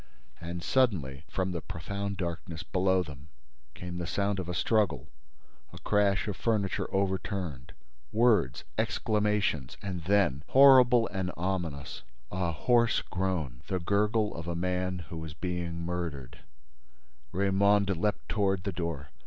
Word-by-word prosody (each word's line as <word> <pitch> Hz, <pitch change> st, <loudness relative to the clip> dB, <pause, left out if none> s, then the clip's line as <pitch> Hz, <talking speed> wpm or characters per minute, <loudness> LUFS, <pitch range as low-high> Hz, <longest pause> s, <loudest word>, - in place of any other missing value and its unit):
And, 85 Hz, +1 st, -6 dB
suddenly, 80 Hz, -, +1 dB
from 95 Hz, 0 st, -2 dB
the 85 Hz, -2 st, -3 dB
profound 100 Hz, +5 st, -4 dB
darkness 85 Hz, -2 st, -4 dB
below 95 Hz, 0 st, +2 dB
them, 70 Hz, -2 st, -11 dB, 0.5 s
came 90 Hz, 0 st, -6 dB
the 85 Hz, -, -3 dB
sound 100 Hz, 0 st, 0 dB
of 90 Hz, -1 st, -4 dB
a -, -, -1 dB
struggle, 105 Hz, -4 st, +1 dB, 0.6 s
a -, -, -11 dB
crash 100 Hz, -1 st, +1 dB
of 105 Hz, -, -2 dB
furniture 105 Hz, -1 st, -1 dB
overturned, 95 Hz, -7 st, -2 dB, 0.4 s
words, 110 Hz, -, +3 dB, 0.2 s
exclamations 105 Hz, -, 0 dB
and 90 Hz, -4 st, -4 dB
then, 90 Hz, -8 st, +2 dB
horrible 130 Hz, -3 st, +7 dB
and 95 Hz, -2 st, -2 dB
ominous, 85 Hz, -8 st, -3 dB, 0.3 s
a 90 Hz, -2 st, -1 dB
hoarse 115 Hz, +7 st, +2 dB
groan, 90 Hz, -10 st, -2 dB
the 95 Hz, -, -1 dB
gurgle 105 Hz, +4 st, +1 dB
of 85 Hz, 0 st, -6 dB
a 85 Hz, -, -2 dB
man 90 Hz, 0 st, -2 dB
who 80 Hz, -1 st, -5 dB
is 75 Hz, -2 st, -7 dB
being 85 Hz, -1 st, -3 dB
murdered— 85 Hz, -8 st, -4 dB, 0.9 s
Raymonde 100 Hz, +1 st, +3 dB
leapt 105 Hz, +5 st, -1 dB
toward 95 Hz, -3 st, +1 dB
the 100 Hz, -, -2 dB
door. 85 Hz, -5 st, -4 dB
90 Hz, 135 wpm, -29 LUFS, 85-100 Hz, 0.9 s, horrible